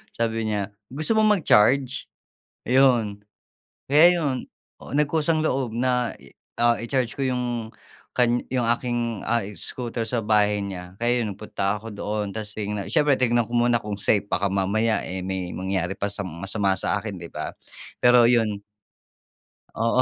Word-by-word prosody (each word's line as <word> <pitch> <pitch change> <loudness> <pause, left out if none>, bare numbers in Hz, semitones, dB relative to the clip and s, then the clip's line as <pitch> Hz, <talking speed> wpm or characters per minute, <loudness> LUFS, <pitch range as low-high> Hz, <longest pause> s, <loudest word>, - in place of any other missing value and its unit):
sabi 115 -1 -1
niya, 100 -2 -1 0.2
"Gusto 155 - -1
mong 215 -2 +4
mag-charge?" 130 +2 +3 0.6
'Yon. 120 -6 +3 0.7
Kaya 150 +4 +7
'yon. 140 -5 0 0.4
Oh - - -9
nagkusang-loob 150 -4 +1
na, 125 0 +1 0.5
ah, 120 0 +4
i-charge 120 0 -1
ko 140 - -1
'yong 120 -3 -2 0.4
kan 120 -1 +3
'yong 125 -2 0
aking, 120 -4 -3
ah, 120 0 +1 0.2
scooter 120 -2 -4
sa 115 +1 -1
bahay 105 -1 +2
niya. 90 -2 -7
Kaya 120 +1 +2
'yon, 105 -3 -2
nagpunta 105 -1 -2
ako 115 +2 -8
doon 105 0 -3
tas 105 -1 -5
signa 105 -1 -3
siyempre, 145 +4 +3
tignan 120 -2 +2
ko 120 - -10
muna 120 -1 +3
kung 105 -1 -5
safe 100 0 +1
baka 100 +2 +1
mamaya, 110 +3 +1
eh, 95 0 -4
may 95 -2 -3
mangyari 95 -1 -2
pa 100 - -1
sa 100 - -5
masama 95 +3 -1
sa 105 - 0
akin, 105 -1 -6
'di 85 -1 -9
ba? - - -5 0.5
Pero 125 -1 +6
'yon. 110 -4 +1 1.2
Oo, 115 +3 +3
115 Hz, 155 wpm, -24 LUFS, 105-125 Hz, 1.2 s, Kaya